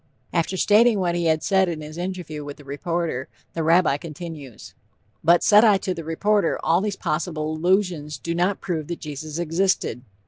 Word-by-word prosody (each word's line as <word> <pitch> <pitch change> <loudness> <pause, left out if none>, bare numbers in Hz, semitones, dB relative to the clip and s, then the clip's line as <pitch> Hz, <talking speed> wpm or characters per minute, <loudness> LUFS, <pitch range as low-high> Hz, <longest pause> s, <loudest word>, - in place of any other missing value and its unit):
"_ - - -45 0.3
After 170 +3 0
stating 220 +3 +4
what 180 -3 0
he 175 0 -1
had 160 -1 +2
said 190 -2 +3
in 160 -2 -4
his 155 +1 -9
interview 175 -4 -5
with 145 0 -8
the 145 - -14
reporter, 145 -1 -3 0.3
the 165 - -2
Rabbi 165 -2 +3
continues: 150 -5 -9 0.5
"But 170 +2 +5
said 210 +1 +6
I 210 -4 +6
to 190 -1 -3
the 165 -2 -7
reporter 190 +4 +1
all 170 +3 +3
these 205 -1 -2
possible 155 -1 -2
allusions 170 -3 0
do 170 - -4
not 180 +3 0
prove 160 -5 -3
that 170 - -5
Jesus 150 +1 -6
existed.... 170 -6 0
170 Hz, 185 wpm, -23 LUFS, 155-185 Hz, 0.5 s, said